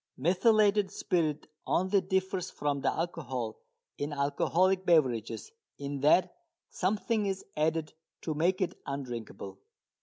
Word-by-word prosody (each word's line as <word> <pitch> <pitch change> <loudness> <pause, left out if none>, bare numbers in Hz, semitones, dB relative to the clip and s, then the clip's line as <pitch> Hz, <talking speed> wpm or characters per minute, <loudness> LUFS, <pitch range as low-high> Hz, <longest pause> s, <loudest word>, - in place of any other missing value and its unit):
Methylated 205 - +3
spirit 160 -5 -1 0.2
only 190 +2 +2
differs 190 -1 -1
from 145 -1 -2
the - - +2
alcohol 130 -9 -3 0.4
in 145 +1 -2
alcoholic 170 +7 +2
beverages 150 - +1 0.3
in 140 0 -4
that 150 +6 +4 0.4
something 210 +2 0
is 195 -1 -3
added 155 0 0 0.3
to 160 - -1
make 175 +5 +1
it 185 - 0
undrinkable. 120 -8 -6
165 Hz, 115 wpm, -30 LUFS, 140-190 Hz, 0.4 s, that